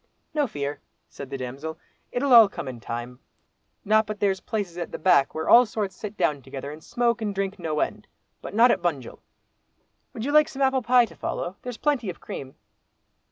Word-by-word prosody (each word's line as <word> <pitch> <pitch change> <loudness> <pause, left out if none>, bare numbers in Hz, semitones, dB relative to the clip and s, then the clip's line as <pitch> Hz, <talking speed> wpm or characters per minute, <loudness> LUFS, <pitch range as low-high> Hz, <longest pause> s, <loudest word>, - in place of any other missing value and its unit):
"No 295 -2 +1
fear!" 145 -7 -4 0.3
said 140 - -9
the 135 - -4
damsel. 135 +5 -6 0.3
"It'll 265 +1 +1
all 225 -4 +9
come 170 -7 -7
in 125 -2 -6
time, 120 +2 -6 0.7
not 215 +1 +3
but 210 -1 -5
there's 195 -2 +1
places 200 -6 -3
at 170 - -5
the - - -5
back 155 -5 +3
where 160 - -3
all 245 0 +7
sorts 205 -3 -3
sit 210 0 -7
down 145 -2 +1
together 135 +2 -7
and 155 +1 -11
smoke 240 -1 0
and 205 -2 -2
drink 195 0 -2
no 155 -3 -1
end. 210 -2 -3 0.3
But - - -8
not 235 +2 +6
at - - 0
Bunjil. 145 -8 -3 0.9
Would 225 - -5
you 285 - -1
like 305 0 +5
some 275 0 -2
apple 265 -1 +2
pie 245 +1 +5
to - - -15
follow, 180 +3 -4
there's 250 -2 -6
plenty 275 -8 0
of 175 - -7
cream?" 130 -1 -8
195 Hz, 205 wpm, -25 LUFS, 145-235 Hz, 0.9 s, all